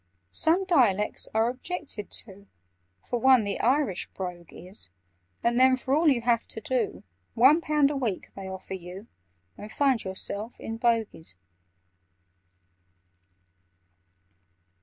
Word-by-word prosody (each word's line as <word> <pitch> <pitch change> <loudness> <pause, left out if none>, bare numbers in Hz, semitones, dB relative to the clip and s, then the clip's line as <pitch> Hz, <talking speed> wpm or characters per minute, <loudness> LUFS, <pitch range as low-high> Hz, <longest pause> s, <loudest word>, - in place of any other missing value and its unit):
"Some 345 +4 +2
dialects 230 - +2
are 220 +1 +2
objected 255 - -6 0.2
to— 200 -1 -15 0.6
For 245 - -1
one, 260 -1 +5
the 200 -1 -3
Irish 255 -7 +1
brogue 180 -3 -6
is: 180 - -10 0.5
And 235 +1 +2
then, 260 0 +5
for 260 +1 0
all 320 +2 +3
you 265 -5 +4
have 230 -1 +1
to - - -8
do, 235 0 -2 0.3
One 270 +8 +6
pound 300 -3 +2
a - - -3
week 235 -8 -3
they 195 -1 -7
offer 190 0 -7
you, 185 +2 -8 0.5
And 210 +1 -9
find 270 -4 +1
yourself 200 +4 -5
in 225 0 -5
Bogies!" 225 - -1
230 Hz, 125 wpm, -27 LUFS, 200-265 Hz, 0.6 s, One